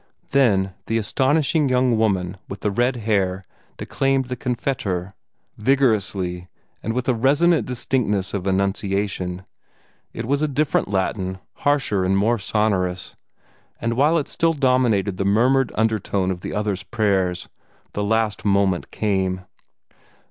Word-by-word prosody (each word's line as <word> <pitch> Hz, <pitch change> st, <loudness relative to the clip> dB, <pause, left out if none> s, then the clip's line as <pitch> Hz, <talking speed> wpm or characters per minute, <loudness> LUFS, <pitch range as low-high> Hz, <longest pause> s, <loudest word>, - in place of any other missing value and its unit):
Then 100 Hz, -9 st, +3 dB
the 115 Hz, -, +1 dB
astonishing 140 Hz, +6 st, +1 dB
young 125 Hz, -1 st, +3 dB
woman 95 Hz, -4 st, 0 dB
with 100 Hz, -, -7 dB
the 105 Hz, -, 0 dB
red 120 Hz, +5 st, +1 dB
hair 100 Hz, -5 st, 0 dB, 0.3 s
declaimed 135 Hz, -1 st, 0 dB
the 125 Hz, -, -2 dB
CONFITEOR, 110 Hz, -7 st, -2 dB, 0.5 s
vigorously 105 Hz, -8 st, +1 dB, 0.3 s
and 115 Hz, -, -2 dB
with 125 Hz, +1 st, -2 dB
a 130 Hz, -, +3 dB
resonant 145 Hz, +8 st, +3 dB
distinctness 115 Hz, -6 st, -1 dB
of 100 Hz, -2 st, -3 dB
enunciation. 95 Hz, -1 st, -1 dB, 0.7 s
It 115 Hz, -, -5 dB
was 140 Hz, +4 st, 0 dB
a 155 Hz, -, +2 dB
different 145 Hz, +1 st, 0 dB
Latin, 95 Hz, -1 st, -1 dB, 0.2 s
harsher 135 Hz, -9 st, +1 dB
and 95 Hz, +1 st, +2 dB
more 115 Hz, +4 st, +2 dB
sonorous; 95 Hz, -4 st, -1 dB, 0.6 s
and 115 Hz, 0 st, -1 dB
while 145 Hz, +7 st, +3 dB
it 150 Hz, -, -1 dB
still 165 Hz, 0 st, +1 dB
dominated 125 Hz, -8 st, +2 dB
the 95 Hz, -, 0 dB
murmured 125 Hz, +6 st, +3 dB
undertone 105 Hz, -4 st, 0 dB
of 90 Hz, -1 st, -5 dB
the -, -, -5 dB
other's 105 Hz, -3 st, -1 dB
prayers, 95 Hz, -4 st, 0 dB, 0.5 s
the 105 Hz, -, -2 dB
last 110 Hz, 0 st, 0 dB
moment 100 Hz, -3 st, +1 dB
came. 95 Hz, -3 st, -1 dB
105 Hz, 135 wpm, -22 LUFS, 95-130 Hz, 0.7 s, Then